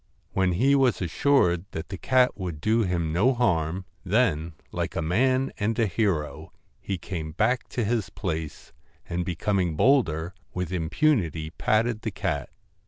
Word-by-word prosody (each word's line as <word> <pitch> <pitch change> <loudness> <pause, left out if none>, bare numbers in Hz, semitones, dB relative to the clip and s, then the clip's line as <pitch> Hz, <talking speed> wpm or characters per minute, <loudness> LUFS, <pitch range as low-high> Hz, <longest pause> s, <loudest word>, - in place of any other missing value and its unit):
When 95 -1 +2
he 130 +10 +3
was 135 -4 +3
assured 90 - +2
that 80 0 -5
the 95 - -5
cat 130 +6 +3
would 90 -7 -5
do 110 +6 +2
him 85 -5 -1
no 120 +10 +3
harm, 90 -6 0 0.2
then 90 -6 +1 0.2
like - - -3
a - - 0
man 130 +10 +2
and 110 +2 0
a 115 - +3
hero 80 -7 -1 0.3
he 95 - -3
came 80 -3 -5
back 125 +9 +1
to 120 - -2
his 110 -2 0
place, 80 -6 -5 0.3
and 90 +1 -2
be 85 0 -3
coming 95 -3 0
bolder, 85 - +2 0.2
with 90 -1 -3
impunity 85 - +1
patted 110 +4 +1
the 110 - -2
cat. 75 -9 -3
95 Hz, 160 wpm, -26 LUFS, 80-115 Hz, 0.3 s, he